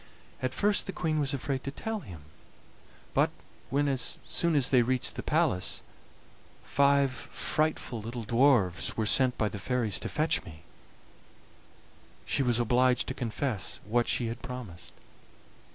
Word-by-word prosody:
At 130 0 -2
first 205 0 +2
the - - -2
Queen 160 -3 0
was 140 -2 +1
afraid 135 -1 -2
to - - -3
tell 220 +10 -4
him, 90 - -10 0.9
but - - +4 0.4
when, 145 +2 +1
as 135 -2 -1
soon 170 -2 +1
as 140 -2 +3
they 130 -2 +6
reached 125 +1 0
the - - -3
palace, 90 - 0 0.8
five 140 -1 +3
frightful 140 -3 -2
little 115 +2 -5
dwarfs 115 -6 +2
were 110 - +1
sent 130 +3 +3
by 110 - +1
the 105 - -5
fairies 115 -1 0
to - - -4
fetch 155 +1 +1
me, 80 -1 -12 1.6
she - - 0
was 120 -3 +2
obliged 125 +1 +3
to - - -2
confess 115 -3 -3
what 120 +3 +1
she 120 - +1
had 115 +1 -4
promised. 115 -10 -8
125 Hz, 150 wpm, -29 LUFS, 115-140 Hz, 1.6 s, they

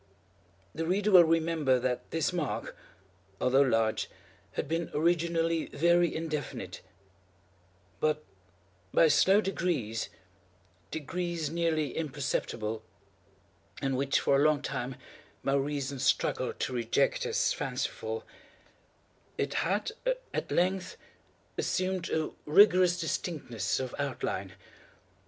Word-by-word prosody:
The 160 0 -3
reader 205 +4 +1
will 180 -3 +9
remember 160 -5 +2
that 125 0 -2
this 165 +1 0
mark, 165 -6 -3 0.6
although 130 +2 +4
large, 115 -5 +2 0.4
had - - -2
been 165 +2 -1
originally 165 0 +1
very 170 +1 +3
indefinite; 150 - -4 1.2
but, 155 0 +1 0.7
by 165 - +5
slow 195 +6 +5
degrees—degrees 115 - -4
nearly 160 -4 0
imperceptible, 130 -7 -2 1.0
and 135 -1 0
which 135 +1 +2
for 140 - +3
a 140 - +3
long 150 -1 +3
time 125 +1 -3 0.5
my 135 - +1
reason 140 -1 -1
struggled - - +1
to 130 - -1
reject 120 +3 +1
as 455 0 +1
fanciful—it 460 -1 -3 1.3
had, - - 0 0.4
at - - -3
length, 185 +1 0 0.6
assumed 185 -1 -1
a 160 -1 -1 0.2
rigorous 180 +1 +6
distinctness 145 - -2
of 130 -2 -4
outline. 110 -9 -3
155 Hz, 100 wpm, -30 LUFS, 130-170 Hz, 1.3 s, will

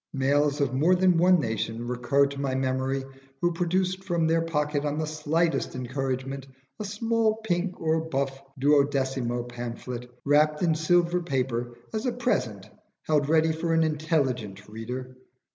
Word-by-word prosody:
Males 145 +2 +2
of 135 -3 +1
more 160 +8 +4
than 180 -2 +3
one 180 +1 +5
nation 115 -1 -2
recur 125 +3 +2
to 140 0 -5
my 135 -2 -1
memory 130 +1 0 0.4
who 175 +2 +1
produced 185 +2 0
from 170 -3 0
their 165 +1 +3
pocket 150 -3 -1
on 145 0 -1
the 155 - 0
slightest 155 +1 0
encouragement 130 +1 -3 0.3
a 210 - -3
small 220 +1 +1
pink 180 -2 -1
or 160 0 +1
buff 135 -1 -2 0.2
duodecimo 135 -4 +1
pamphlet, 120 0 -6 0.2
wrapped 150 +2 +3
in 165 -2 +3
silver 175 +2 +2
paper, 125 -6 -2 0.2
as 220 +3 -1
a - - +2
present 125 - -1 0.4
held 150 -2 +1
ready 160 0 +4
for 165 +1 -1
an 165 - +4
intelligent 140 - -1
reader. 125 +4 -6
145 Hz, 150 wpm, -27 LUFS, 130-165 Hz, 0.4 s, one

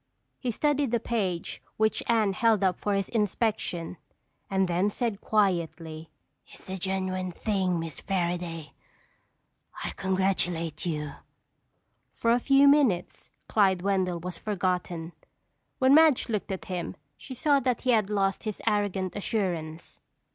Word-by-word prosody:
He 255 - -2
studied 285 +3 +1
the 235 0 +1
page 195 -7 -2 0.2
which 220 0 +2
Anne 220 -4 +3
held 220 0 +3
up 185 -2 +2
for 205 -1 0
his 195 -1 0
inspection 210 -5 -1 0.5
and 190 -1 +2
then 180 +4 +1
said 220 -1 -2
quietly: 165 -6 0 0.4
"It's - - -15
the 190 0 -5
genuine 185 0 -2
thing. 185 -2 0
Miss 165 -2 -6
Fairaday, 175 -4 -2 1.1
I - - -2
congratulate 180 -4 -1
you." 150 -3 -3 1.0
For 230 - +1
a 240 - +4
few 275 +2 +5
minutes 270 -12 +2 0.2
Clyde 190 -4 +3
Wendell 190 -3 +1
was 180 -1 -6
forgotten. 180 -4 -2 0.7
When 260 +1 +5
Madge 310 -5 +5
looked 210 -3 -2
at 190 - -4
him 180 -1 -4 0.2
she 260 - -9
saw 285 +2 +3
that 255 -2 0
he 255 - +2
had 215 -4 +2
lost 195 -1 0
his 215 -2 -3
arrogant 205 -4 0
assurance. 175 -7 -3
195 Hz, 135 wpm, -28 LUFS, 175-220 Hz, 1.1 s, few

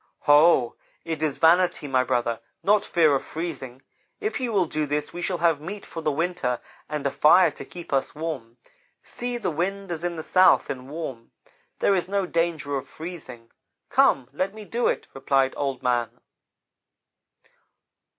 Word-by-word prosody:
"'Ho! 145 -4 +5 0.3
It 160 -2 -3
is 155 -3 0
vanity, 170 -1 +3
my 130 -2 +2
brother, 120 -2 0 0.2
not 205 +1 +4
fear 160 -7 +3
of 135 - 0
freezing. 140 -6 -6 0.4
If 425 -6 -2
you 250 -3 -2
will 195 -4 +2
do 155 -1 -2
this 150 +1 -2
we 175 - -5
shall 180 0 -1
have 165 -3 +2
meat 195 +6 -7
for 165 - -7
the 155 - 0
winter, 155 -5 -1 0.3
and 150 -2 -4
a 140 - +1
fire 170 +2 +5
to - - -9
keep 175 -4 -9
us 135 +1 0
warm. 145 -7 -5 0.5
See, 245 0 -4
the 235 - -2
wind 190 +4 -3
is 170 -1 -4
in 175 -1 -2
the 160 - -5
south 185 +3 +4
and 130 0 -7
warm. 135 -7 -6 0.5
There 200 - +3
is 180 -1 0
no 200 -1 0
danger 165 -5 -1
of 135 - -6
freezing. 150 -9 -9 0.4
Come, 130 -3 +4
let 190 +7 -2
me 215 -1 -9
do 235 +4 0
it,' - - -1
replied 135 0 +1
Old 135 -3 -3
man. 120 -2 +1
160 Hz, 170 wpm, -25 LUFS, 135-180 Hz, 0.5 s, Ho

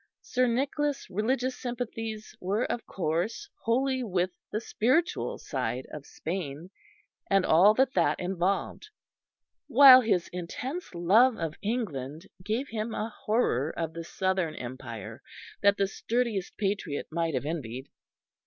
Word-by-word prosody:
Sir 255 0 +1
Nicholas' 275 +4 -1
religious 250 +6 0
sympathies 225 -3 -5
were, 200 +6 0
of 240 - -4
course, 175 +4 -2 0.2
wholly 260 +3 +1
with 185 -5 0 0.2
the 215 - -1
spiritual 255 +9 0
side 130 +1 -3
of 150 -2 -8
Spain, 165 0 -5 0.6
and 195 -1 +3
all 190 +7 +6
that 265 +1 +2
that - - +2
involved, 185 - -1 0.8
while 265 -2 +10
his 205 -7 +1
intense 250 - -5
love 220 +9 +5
of 160 -2 -3
England 165 - -3 0.2
gave 225 +8 -1
him 220 0 -3
a 220 - -2
horror 165 - +1
of 165 -1 -2
the 165 0 -6
Southern 185 -2 -1
Empire 115 -4 -7 0.4
that 200 0 +4
the 200 - +3
sturdiest 220 -1 -2
patriot 195 -8 -2
might 165 -2 -1
have 130 - -2
envied. 135 -4 -4
195 Hz, 130 wpm, -28 LUFS, 165-240 Hz, 0.8 s, while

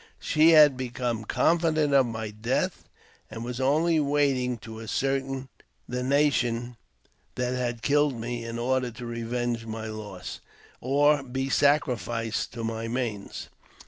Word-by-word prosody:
She 155 +2 +4
had 150 -4 +7
become 120 -3 -3
confident 160 0 +2
of 135 -3 +5
my 110 -2 -4
death, 110 +4 -2 0.4
and 115 - -7
was 125 +1 -4
only 155 +5 +3
waiting 140 -4 +1
to 110 0 -9
ascertain 135 +3 -2 0.4
the 125 0 -3
nation 125 -3 +1 0.6
that, 125 0 -1
had 120 -2 -3
killed 145 -3 +2
me 120 +1 -4
in 115 0 -5
order 125 +1 0
to 120 +1 -9
revenge 115 0 -3
my 110 0 -5
loss, 105 -4 -7 0.4
or 145 +3 +3
be 135 0 -3
sacrificed 120 -6 +1
to 115 -1 -5
my 115 0 -3
manes. 115 -4 -4
125 Hz, 135 wpm, -27 LUFS, 115-140 Hz, 0.6 s, had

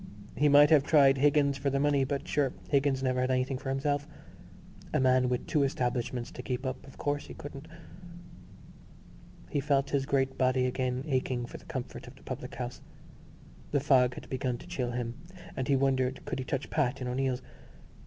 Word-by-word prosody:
He 150 0 +3
might 145 +2 +7
have 155 -3 +7
tried 140 -3 +5
Higgins 140 -1 +3
for 140 - 0
the 135 0 0
money, 145 -1 +3
but 140 0 -3
sure 140 -3 +1 0.2
Higgins 135 -2 +2
never 130 -1 +1
had 130 - 0
anything 130 0 0
for 135 - -5
himself. 145 +2 -1 0.9
A - - +4
man 130 -1 +3
with 125 -1 -1
two 150 - +1
establishments 125 -2 -1
to - - -7
keep 125 +1 -3
up, 130 +1 -4
of 135 - -14
course 145 0 -2
he - - -9
couldn't.... 145 +1 -9 1.8
He 145 - +1
felt 140 0 +1
his 135 -1 0
great 135 -1 0
body 130 0 +3
again 125 0 -1
aching 130 -4 -1
for - - -9
the - - -19
comfort 130 -4 -6
of 125 - -12
the - - -19
public 125 -1 -6
house. 125 -1 -5 0.9
The 145 - +2
fog 130 -3 +3
had - - -9
begun 130 -1 -2
to - - -13
chill 130 -9 -2
him 120 -1 -3 0.4
and 130 - -2
he 140 - +3
wondered 130 -1 +1
could - - -3
he 130 - -4
touch 135 +1 -3
Pat 135 -5 0
in 125 - -4
O'Neill's. 130 0 -1
135 Hz, 195 wpm, -30 LUFS, 125-140 Hz, 1.8 s, might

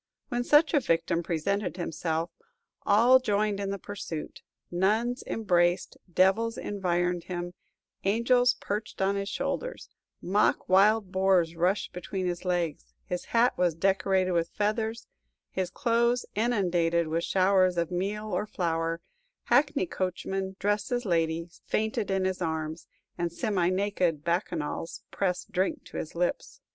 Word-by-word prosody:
When 245 0 -1
such 295 +6 +5
a 295 - +5
victim 170 -6 +1
presented 180 +4 -1
himself, 165 -1 -2 0.6
all 235 +6 +6
joined 210 -3 0
in 200 -1 -2
the 200 - -2
pursuit: 185 -5 -7 0.3
nuns 220 +8 +1
embraced, 175 -4 +1 0.2
devils 195 +6 +3
environed 175 -3 -1
him, 175 -1 -4 0.5
angels 245 +5 +3
perched 210 +2 -4
on 195 +1 +2
his 200 0 -2
shoulders, - - -3 0.3
mock 200 +4 +1
wild 200 +1 +4
boars 185 -3 +2
rushed 180 +5 0
between 185 +1 -4
his 175 -1 -2
legs; 175 -4 -2
his 180 - -4
hat 235 +1 +3
was 175 -3 +2
decorated 190 +1 +2
with 170 -1 +1
feathers, 220 +2 -1 0.5
his 185 -2 -2
clothes 235 +4 +1
inundated 175 -7 +1
with 165 +2 -1
showers 185 -1 +3
of 170 0 0
meal 205 +4 -2
or 210 +4 -1
flour; 165 -2 -1 0.4
hackney 285 -7 +3
coachmen, 190 +2 -3
dressed 205 +4 -1
as 245 -1 -1
ladies, 165 -1 -1
fainted 220 -1 -1
in 190 -1 +1
his 185 0 -1
arms, 160 -1 -3 0.3
and 170 -1 -1
semi 180 0 0
naked 185 -5 0
bacchanals 170 -2 -2
pressed 190 +2 -2
drink 195 - 0
to - - -8
his - - -5
lips. - - -2
190 Hz, 135 wpm, -28 LUFS, 175-215 Hz, 0.6 s, all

